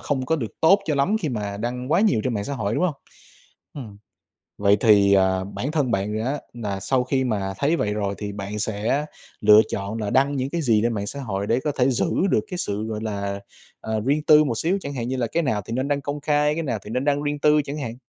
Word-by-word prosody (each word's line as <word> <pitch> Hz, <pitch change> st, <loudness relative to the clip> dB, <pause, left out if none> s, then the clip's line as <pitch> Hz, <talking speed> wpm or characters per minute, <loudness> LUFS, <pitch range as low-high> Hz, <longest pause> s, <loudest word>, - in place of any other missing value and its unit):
không 130 Hz, -3 st, -2 dB
có 160 Hz, -, +1 dB
được 115 Hz, -7 st, -6 dB
tốt 190 Hz, +5 st, +6 dB
cho 155 Hz, -, 0 dB
lắm 145 Hz, +10 st, +2 dB
khi 155 Hz, -, -2 dB
mà 105 Hz, -5 st, -3 dB
đăng 125 Hz, +5 st, -3 dB
quá 175 Hz, -, +4 dB
nhiều 205 Hz, -, +3 dB
trên 125 Hz, -, -1 dB
mạng 100 Hz, -1 st, -2 dB
xã 140 Hz, -, -4 dB
hội, 110 Hz, -2 st, -2 dB
đúng -, -, +1 dB
hông? 175 Hz, -5 st, 0 dB, 0.8 s
Ừm. 110 Hz, -8 st, -9 dB, 0.6 s
Vậy 100 Hz, 0 st, +4 dB
thì, 100 Hz, -3 st, +5 dB
à, 95 Hz, -1 st, +2 dB
bản 110 Hz, +8 st, -4 dB
thân 145 Hz, -6 st, 0 dB
bạn 105 Hz, 0 st, -1 dB
á 140 Hz, +3 st, -1 dB
là 105 Hz, -5 st, -4 dB
sau 125 Hz, +6 st, +1 dB
khi 130 Hz, 0 st, 0 dB
mà 100 Hz, -5 st, -2 dB
thấy 150 Hz, +4 st, +2 dB
vậy 105 Hz, -8 st, -1 dB
rồi 100 Hz, -2 st, -2 dB
thì 105 Hz, -1 st, -5 dB
bạn 100 Hz, +1 st, -5 dB
sẽ 110 Hz, +8 st, -1 dB, 0.3 s
lựa 105 Hz, 0 st, +7 dB
chọn 100 Hz, +3 st, -4 dB
là 105 Hz, -1 st, -2 dB
đăng 140 Hz, +2 st, +2 dB
những 130 Hz, +1 st, -2 dB
cái 170 Hz, -, -2 dB
gì 115 Hz, -5 st, +3 dB
trên 120 Hz, 0 st, +1 dB
mạng 100 Hz, -1 st, -3 dB
xã 140 Hz, -, -6 dB
hội 100 Hz, -6 st, -3 dB
để 115 Hz, +4 st, +1 dB
có 150 Hz, -, 0 dB
thể 125 Hz, 0 st, +4 dB
giữ 130 Hz, +6 st, 0 dB, 0.2 s
được -, -, +3 dB
cái 180 Hz, -, -4 dB
sự, 105 Hz, -7 st, -2 dB
gọi 110 Hz, -1 st, -4 dB
là, 100 Hz, -2 st, -3 dB, 0.4 s
à, 110 Hz, -, -5 dB
riêng 145 Hz, +2 st, +2 dB
tư 155 Hz, 0 st, +6 dB
một 120 Hz, -6 st, -2 dB
xíu, 180 Hz, +5 st, +1 dB
chẳng 140 Hz, -3 st, -6 dB
hạn 120 Hz, -2 st, -3 dB
như 130 Hz, -, -2 dB
là 125 Hz, -2 st, 0 dB
cái 170 Hz, +8 st, -1 dB
nào 110 Hz, -8 st, -1 dB
thì -, -, -6 dB
nên 130 Hz, +2 st, -1 dB
đăng 145 Hz, -1 st, 0 dB
công 145 Hz, +2 st, -4 dB
khai, 150 Hz, 0 st, +2 dB
cái 165 Hz, -, -2 dB
nào 120 Hz, -7 st, -2 dB
thì 105 Hz, -, -9 dB
nên 125 Hz, +4 st, -1 dB
đăng 145 Hz, 0 st, +1 dB
riêng 145 Hz, 0 st, -2 dB
tư 150 Hz, +1 st, +4 dB
chẳng 145 Hz, +2 st, -5 dB
hạn? 120 Hz, -5 st, -5 dB
125 Hz, 265 wpm, -23 LUFS, 105-145 Hz, 0.8 s, lựa